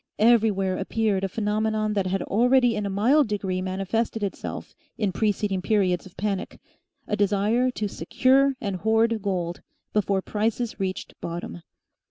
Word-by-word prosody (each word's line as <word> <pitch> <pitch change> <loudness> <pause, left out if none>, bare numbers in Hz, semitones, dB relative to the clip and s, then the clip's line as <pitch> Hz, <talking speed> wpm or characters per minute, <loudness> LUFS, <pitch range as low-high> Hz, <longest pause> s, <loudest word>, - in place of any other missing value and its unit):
Everywhere 210 -4 +3
appeared 205 0 0
a - - +1
phenomenon 215 +1 0
that 200 -2 0
had 190 0 -1
already 245 +2 +3
in 210 -1 -2
a - - -3
mild 245 +9 +3
degree 195 -3 -2
manifested 195 +4 -2
itself 200 - -5 0.2
in 205 -4 0
preceding 205 -1 0
periods 190 -3 +1
of 185 - -19
panic; 200 -2 -3 0.5
a 210 - 0
desire 210 +5 +2
to 215 -4 -3
SECURE 265 +10 +2
AND 200 -5 -3
HOARD 225 +3 +2
GOLD 180 -3 -2 0.3
before 200 -2 +1
prices 225 +2 -2
reached 190 -1 -3
bottom. 165 - -5
210 Hz, 145 wpm, -25 LUFS, 190-225 Hz, 0.5 s, Everywhere